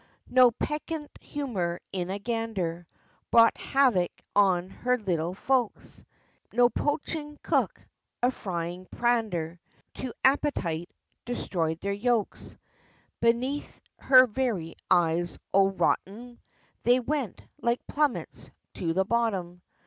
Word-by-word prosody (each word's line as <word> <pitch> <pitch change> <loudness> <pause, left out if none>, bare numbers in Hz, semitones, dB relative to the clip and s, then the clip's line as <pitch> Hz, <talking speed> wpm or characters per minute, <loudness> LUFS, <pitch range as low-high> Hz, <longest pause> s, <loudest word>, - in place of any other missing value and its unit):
No 255 -1 +7
peccant 300 +5 -4
humor 190 -12 -3
in 180 -1 -2
a 195 - -2
gander 200 -6 -3 0.4
Brought 230 0 +6
havoc 245 -11 +2 0.3
on 185 -2 +3
her 250 +4 0
little 180 -5 -2
folks, 250 +1 -1 0.5
No 240 0 +5
poaching 295 0 -2
cook - - +1 0.4
a 250 - +4
frying 175 -4 -5
pander 210 -9 0 0.4
To 255 - -3
appetite, 190 - +1 0.3
destroyed 170 -9 -2
their 200 0 -1
yolks, 220 +1 -1 0.6
Beneath 250 +5 0 0.2
her 255 -1 +7
very 215 -9 -2 0.2
eyes, 175 0 +2 0.2
Od 195 0 +3
rot - - +4
'em! 235 +5 -12 0.4
They 245 +1 +4
went, 260 -4 -3 0.2
like 235 +1 0
plummets, 295 -3 -1 0.2
to 165 -2 -1
the 190 +2 +2
bottom. 195 -6 -1
225 Hz, 110 wpm, -28 LUFS, 180-250 Hz, 0.6 s, No